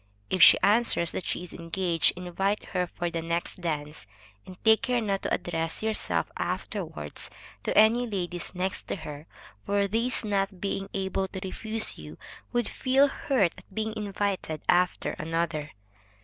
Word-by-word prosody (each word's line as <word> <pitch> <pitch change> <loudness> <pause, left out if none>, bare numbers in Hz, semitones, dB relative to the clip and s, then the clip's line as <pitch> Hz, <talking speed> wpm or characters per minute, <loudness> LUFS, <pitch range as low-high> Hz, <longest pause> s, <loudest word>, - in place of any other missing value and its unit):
If 185 - +1
she - - +10
answers 210 -5 +4
that 185 - -4
she - - -2
is 180 - -10
engaged, 170 -1 +2
invite 185 +3 -1
her 180 -1 0
for 175 0 -3
the 165 0 -2
next 170 +2 -2
dance, 150 -8 -4 0.4
and 185 -1 -10
take 220 0 +6
care 250 -2 +1
not 200 -3 -1
to - - -3
address 165 +2 -2
yourself 220 -1 +1
afterwards - - -4 0.4
to - - 0
any 230 +3 +6
ladies 180 -4 -4
next 185 +1 -3
to - - -2
her, 155 -3 -8 0.4
for 200 0 +1
these 230 +3 -1
not 195 -2 0
being 195 0 -2
able 190 0 -1
to 190 - -6
refuse 220 +3 0
you, 75 +1 -10 0.3
would 240 -2 +1
feel 270 +2 +3
hurt 250 - +1
at 190 0 -20
being 220 0 -2
invited 200 -6 -2
after 180 0 +2
another. 165 -1 -2
190 Hz, 160 wpm, -28 LUFS, 170-215 Hz, 0.4 s, she